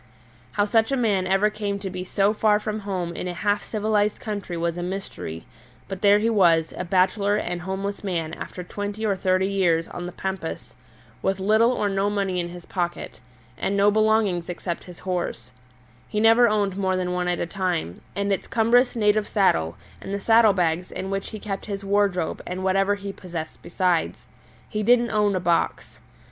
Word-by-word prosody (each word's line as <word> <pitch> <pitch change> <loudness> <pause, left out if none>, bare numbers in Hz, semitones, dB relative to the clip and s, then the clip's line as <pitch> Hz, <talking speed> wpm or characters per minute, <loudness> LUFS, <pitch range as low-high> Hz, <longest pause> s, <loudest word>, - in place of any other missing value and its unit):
How 205 - +2
such 225 +3 +2
a 275 - +1
man 205 -6 +1
ever 195 +3 +3
came 205 -1 -3
to 195 -1 -5
be 180 0 -4
so 195 +2 +1
far 210 -1 +3
from 215 0 -3
home 185 -4 -3
in - - -4
a 175 - -4
half 205 +2 0
civilized 210 -1 0
country 205 -5 -4
was 170 0 -1
a 175 - -4
mystery, 175 - -5 0.4
but 195 -1 -6
there 205 0 +6
he 215 +2 +1
was, 170 -6 +3
a - - -3
bachelor 190 +3 +2
and 175 -3 -2
homeless 195 +3 -4
man 165 -5 -2
after 180 - -7
twenty 205 +4 -4
or 200 -2 +2
thirty 185 0 +1
years 175 -4 +1
on 175 0 -6
the - - -6
pampas, 190 -3 -5 0.5
with 195 0 0
little 220 +5 +4
or 210 -4 0
no 195 0 +1
money 195 -3 -1
in 175 0 -2
his 175 0 -10
pocket, 175 -2 -4 0.4
and 200 - 0
no 200 +1 +5
belongings 215 -5 +2
except 175 0 -4
his 180 -2 -11
horse 175 -10 -4 0.6
he 210 - -1
never 225 +2 +6
owned 205 -3 0
more 190 -1 +1
than 180 -1 -1
one 180 0 -1
at 175 0 0
a - - 0
time 175 - -2
and 200 0 0
its 195 - -3
cumbrous 240 +3 +3
native 210 -1 +2
saddle, 85 - +2 0.2
and - - -7
the - - -3
saddle 225 0 +5
bags 175 -1 0
in 190 +1 -5
which 195 0 -3
he 215 - -7
kept 200 -1 -5
his 200 -1 -4
wardrobe 195 -4 +1
and 185 +1 -4
whatever 195 +2 +2
he 200 -1 -6
possessed 170 -5 -7
besides. 180 -1 0 0.4
He 215 - -3
didn't 240 +2 +3
own 210 -2 +2
a - - +1
box. 170 -1 -1
195 Hz, 195 wpm, -24 LUFS, 180-210 Hz, 0.6 s, there